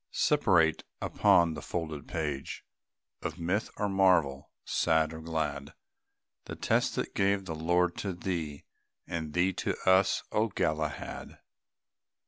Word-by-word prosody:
Separate, 90 - +3 0.2
upon 85 -2 +3
the 75 - -6
folded 80 -4 -4
page 75 -4 -4 0.6
Of 80 -1 -4
myth 90 +6 -1
or 105 - 0
marvel, 90 -8 +2 0.2
sad 80 -1 +2
or 80 - -7
glad, 75 -3 -3 0.7
The - - -6
test - - +1
that - - -3
gave 100 0 +1
the 85 - -4
Lord 85 +2 +1
to 100 -2 -3
thee, 85 -5 -4 0.4
And 80 -3 -4
thee 90 +2 +3
to - - -2
us, 95 +1 +4
O 110 +1 +2
Galahad! 80 -7 -3
85 Hz, 125 wpm, -30 LUFS, 80-95 Hz, 0.7 s, us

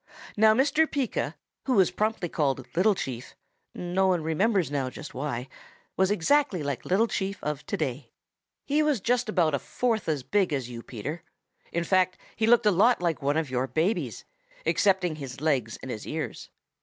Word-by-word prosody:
Now 215 +1 +5
Mr. 295 +5 +3
Pika, 275 -7 -2 0.3
who 265 - +1
was 190 -4 +4
promptly 215 -1 -1
called 135 -5 -1
Little 195 +4 +4
Chief, 125 -8 -6 0.4
no 180 +2 0
one 180 -4 +1
remembers 185 +1 +1
now 135 -3 -1
just - - -9
why, 130 -2 -3 0.5
was 190 0 +3
exactly 205 - +2
like 140 -3 -3
Little 195 +5 +3
Chief 195 -3 -2
of 150 -1 -3
today. 140 -2 -3 0.6
He 295 +2 +2
was 300 -5 +2
just 245 +2 0
about 170 -7 +2
a 140 - +1
fourth 230 - -1
as 145 -4 -1
big 190 0 +1
as 130 -3 -2
you, 115 -1 -7
Peter. 135 +9 -6 0.5
In 170 - 0
fact, 185 0 +2 0.2
he 220 - +1
looked 235 -1 +5
a 210 - +6
lot 215 +7 +4
like 170 -3 -1
one 145 +2 +1
of 155 -5 -1
your 130 +1 0
babies, 170 +10 -1 0.4
excepting 185 -5 +2
his 135 -4 -7
legs 135 -7 0
and 130 - -5
his 110 - -6
ears. 160 0 -5
175 Hz, 180 wpm, -27 LUFS, 140-215 Hz, 0.6 s, a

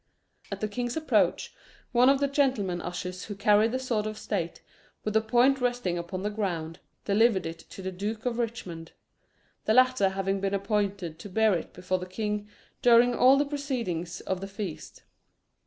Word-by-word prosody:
At - - -5
the 215 - 0
king's 240 +5 -3
approach, 315 - +1 0.4
one 250 +1 +5
of 275 0 +4
the 280 - +2
gentlemen 255 -11 +1
ushers 180 +1 -5
who 205 - -6
carried 210 +2 +4
the 255 - 0
sword 235 -5 -1
of 215 0 -5
state, 175 -7 -3 0.4
with 215 - -2
the 220 - +4
point 245 +4 +3
resting 245 -8 0
upon 175 +2 -4
the 210 - -1
ground, 175 -6 -3 0.3
delivered 205 -1 +3
it 165 0 -5
to 190 - -11
the 190 - -3
Duke 210 +5 -4
of 245 -1 -1
Richmond, 185 -9 -4 0.7
the 215 - +3
latter 255 -6 +5
having 195 0 -1
been 195 0 0
appointed 195 -4 -1
to 205 - -8
bear 220 +2 +3
it 170 - -3
before 185 0 -2
the 180 - -6
king 210 +2 -3 0.3
during 245 0 +6
all 255 +3 +6
the 290 - +2
proceedings 245 - -3
of 190 -1 -3
the 195 - -4
feast. 195 -4 -7
210 Hz, 180 wpm, -28 LUFS, 185-240 Hz, 0.7 s, during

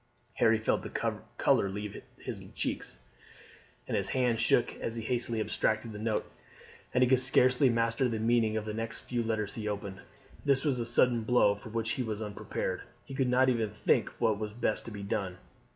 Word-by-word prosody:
Harry 115 -2 +5
felt 110 - +1
the - - -3 0.2
colour 100 - +3
leave 105 +1 -5 0.2
his - - -6
cheeks, - - -3 0.9
and - - -1
his - - 0
hand 125 -3 +1
shook 115 +1 +3
as 115 - -4
he 115 - -4
hastily 120 -1 -1
abstracted 110 +1 0
the 105 - -7
note, 110 0 0 0.7
and 125 - +3
he - - +4
could 130 0 +4
scarcely 130 +1 +4
master 115 +2 +1
the 115 - -1
meaning 110 -1 +2
of 110 - -3
the 105 - -4
next 115 +1 -3
few 120 -1 -2
letters 110 -3 -1
he 110 -2 -4
opened. 100 -2 -4 0.4
This 140 0 +2
was 135 -4 +1
a 115 - -2
sudden 120 0 +3
blow 110 -2 +4
for 100 +2 -10
which 115 0 -1
he 130 - -1
was 110 -3 -3
unprepared. 105 -2 -3 0.2
He - - -9
could 135 -1 +1
not 130 +1 +4
even 115 -4 +1
think 105 - +1
what 110 -2 +2
was 105 -1 -4
best 110 -1 -1
to 115 - -7
be 100 -1 -6
done. 95 -2 -2
115 Hz, 200 wpm, -30 LUFS, 105-125 Hz, 0.9 s, Harry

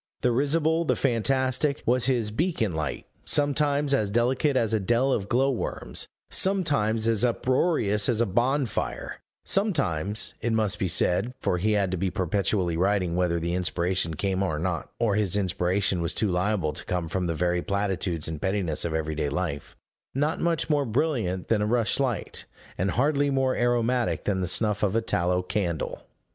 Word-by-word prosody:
The 125 - +2
risible, 155 +6 +2
the 160 - +1
fantastic, 130 +3 +1
was 125 +1 +2
his 120 -5 +1
beacon 145 - 0
light; 80 -1 -3 0.2
sometimes 145 0 +1
as 110 -7 +1
delicate 125 +5 +1
as 115 -3 +1
a 110 - +2
dell 120 +7 +1
of 100 -1 -2
glow 135 +3 +3
worms; 125 - -3 0.2
sometimes 140 - +1
as 115 -1 +2
uproarious 125 - +1
as 115 -3 +1
a 120 - +4
bonfire; 125 +6 -1 0.3
sometimes, 110 - 0
it 115 0 0
must 110 -3 0
be 95 - 0
said 100 +8 +1
(for 90 - 0
he 105 +4 +1
had 100 -3 +1
to 95 - -1
be 95 +2 0
perpetually 95 -1 0
writing 90 -1 +1
whether 90 -1 +1
the 85 +1 -2
inspiration 90 -1 0
came 95 +3 -1
or 80 -6 0
not, 85 +1 -2
or 115 -4 +2
his 100 -3 +2
inspiration 95 -1 0
was 85 +1 -1
too 110 - +1
liable 90 -3 0
to - - -6
come 90 -2 -2
from 90 +2 -2
the 85 - -1
very 90 +1 0
platitudes 95 -4 -1
and 80 -2 -5
pettinesses 95 -6 -1
of 80 -2 -2
everyday 80 -1 -1
life), 70 +1 -4 0.4
not 150 +4 0
much 170 -2 +1
more 150 -2 +2
brilliant 115 - -1
than 110 -2 +2
a 105 - +1
rush 115 +1 +2
light, 130 -5 -1 0.3
and 95 +2 -1
hardly 140 - +1
more 135 -1 +1
aromatic 120 0 +1
than 95 -2 0
the 90 - -1
snuff 105 +3 0
of 105 0 +1
a 115 - +3
tallow 90 -3 0
candle. 90 -4 -3
105 Hz, 175 wpm, -26 LUFS, 90-130 Hz, 0.4 s, a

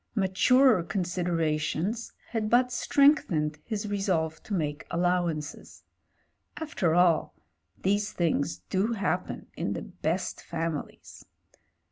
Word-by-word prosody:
Maturer 220 +4 +4
considera 170 -4 -1
tions 195 +10 -2 0.2
had 220 -2 -1
but 250 +2 +4
strengthened 195 - +3
his 215 -2 -3
resolve 185 -6 -1
to 205 - -4
make 150 -3 -2
allow 175 0 +1
ances. 155 -2 -6 0.7
After 255 - 0
all, 175 -2 +3 0.5
these 205 +2 +1
things 165 -4 -1
do 200 +5 +1
happen 200 -3 -2
in - - -2
the - - -5
best - - -3
families. 165 -3 -5
180 Hz, 110 wpm, -28 LUFS, 165-215 Hz, 0.7 s, Maturer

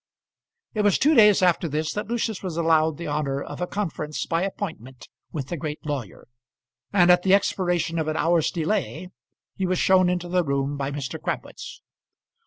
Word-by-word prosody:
It 215 - 0
was 205 -2 +3
two 300 +3 +3
days 210 -7 +6
after 175 -1 +3
this 155 +1 -2
that 210 0 -4
Lucius 225 -3 -2
was 180 -4 -5
allowed 160 -2 +2
the 170 - -6
honour 145 -2 -1
of 140 - -7
a 180 - -1
conference 160 -7 -3
by 165 -1 0
appointment 160 - -6 0.2
with 140 -5 -5
the 175 - -3
great 150 +2 -6
lawyer; 140 -9 -5 0.6
and 180 -3 +5
at 180 0 +5
the 190 +1 +5
expiration 175 -4 0
of 155 - -2
an 155 - -1
hour's 165 -1 +2
delay 180 0 -2 0.5
he 190 - -1
was 185 0 0
shown 185 0 +4
into 180 -1 -2
the 180 0 +1
room 140 -1 -1
by 140 -1 -3
Mr. 140 -3 -5
Crabwitz. - - -6
170 Hz, 185 wpm, -24 LUFS, 150-185 Hz, 0.6 s, days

